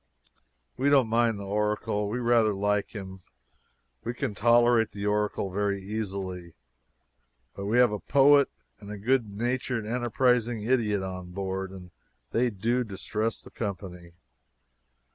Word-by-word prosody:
We 140 +2 +2
don't 135 -5 +4
mind 115 -1 +2
the 100 - -7
Oracle. 105 0 -1
We 115 - -2
rather 115 -3 +3
like 105 +2 -1
him. 95 -2 -7 0.8
We 120 +1 -4
can 110 - -2
tolerate 120 0 +4
the 100 0 -6
Oracle 105 -2 0
very 100 +1 0
easily, 95 -4 -5 1.0
but 100 0 -6
we 110 +4 +2
have 125 -2 +5
a 105 - -3
poet 140 +2 +5 0.3
and 100 -1 -11
a 105 - -5
good 120 +2 +1
natured 120 +2 -2
enterprising 120 -1 +1
idiot 110 -5 +1
on 90 -1 -6
board, 95 0 -3
and 90 -2 -11 0.4
they 125 +1 +2
do 115 +4 0
distress 110 +1 -3
the - - -13
company. 90 -5 -6
105 Hz, 140 wpm, -27 LUFS, 100-120 Hz, 1.0 s, have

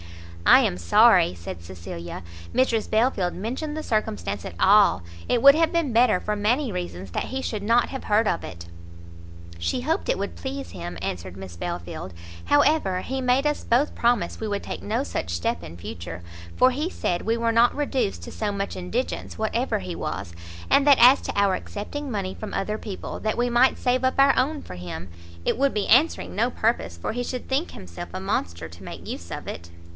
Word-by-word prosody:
"I - - +9
am 90 - 0
sorry," 85 +1 +5
said 85 0 -8
Cecilia, 85 0 -8 0.3
"Mrs 240 -4 +1
Belfield 220 -5 +1
mentioned 260 - -4
the 310 - -4
circumstance 100 - -2
at 85 - -7
all; 200 - +5 0.3
it 240 - +2
would 280 0 +10
have 325 0 +2
been 330 -7 0
better, 230 -5 +4
for 210 +2 -2
many 235 +5 +1
reasons, 95 - -5
that - - -2
he 265 +1 -4
should 215 -3 -3
not 230 +3 +3
have 265 - -6
heard 215 +1 +3
of 170 - 0
it." 85 -1 -8 0.9
"She 85 0 -1
hoped - - -1
it - - +2
would 85 - -4
please 90 +1 -6
him," 85 -1 -6
answered 90 +1 -5
Miss 95 -3 -9
Belfield, 85 +1 -5 0.3
"however, 190 - +3
he 265 +5 -3
made 255 +2 +2
us 295 0 0
both 250 +6 +2
promise 235 -7 +1
we 220 - -3
would 205 -1 -2
take - - -5
no 225 +6 -1
such 280 - -4
step 85 0 -1
in 85 0 -9
future, 85 0 -7 0.4
for 255 - +6
he 300 +7 -2
said 175 - -2
we 225 +2 0
were 230 0 +1
not 235 +1 +5
reduced 260 - -1
to - - -8
so 210 -2 -2
much 200 0 -3
indigence, 210 +8 -3
whatever 220 +1 0
he 180 -3 -5
was; 100 - -4 0.4
and 280 - +5
that 280 -2 +8
as 250 +4 +8
to - - -3
our 200 -1 +4
accepting 260 +9 -5
money 195 -3 -2
from 215 - -7
other 210 +2 -2
people, 200 -4 -6
that 215 - -1
we 245 +1 +1
might 240 +2 +4
save 250 +1 +1
up 260 - +2
our 275 0 +6
own 285 +3 0
for - - -9
him, 90 -1 -7 0.4
it - - +1
would 275 +1 +2
be 210 -2 -1
answering 280 +8 +3
no 230 +4 +2
purpose, 220 - -1
for 85 - -3
he 245 +1 -2
should 250 0 -5
think 275 +6 -1
himself 90 - -9
a 185 - -3
monster 85 - -2
to 85 +1 -14
make - - -9
use 85 - -6
of - - -6
it." 85 0 -7
210 Hz, 205 wpm, -25 LUFS, -, 0.9 s, would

